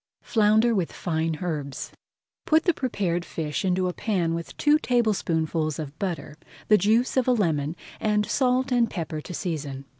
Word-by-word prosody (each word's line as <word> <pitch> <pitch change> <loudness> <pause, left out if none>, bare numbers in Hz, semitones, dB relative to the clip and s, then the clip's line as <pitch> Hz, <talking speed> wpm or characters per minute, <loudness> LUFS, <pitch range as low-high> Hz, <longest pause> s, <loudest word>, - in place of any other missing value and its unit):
FLOUNDER 220 +2 +3
WITH 185 -6 0
FINE 160 -2 -1
HERBS 150 -5 -4 0.6
Put 315 0 +4
the 350 - +3
prepared 195 - -1
fish 155 -3 -3
into 185 -1 +1
a 180 - -2
pan 180 -7 0
with 165 0 -6
two 300 +1 +4
tablespoonfuls 165 - 0
of 150 -1 -7
butter, 175 -5 -4 0.3
the 210 - +7
juice 225 +7 +2
of 260 - +2
a - - +5
lemon, 160 -8 0 0.2
and 210 -1 +1
salt 255 +1 +1
and 240 -2 +3
pepper 160 -4 -4
to 180 - -8
season. 145 -6 -4
180 Hz, 160 wpm, -25 LUFS, 160-225 Hz, 0.6 s, the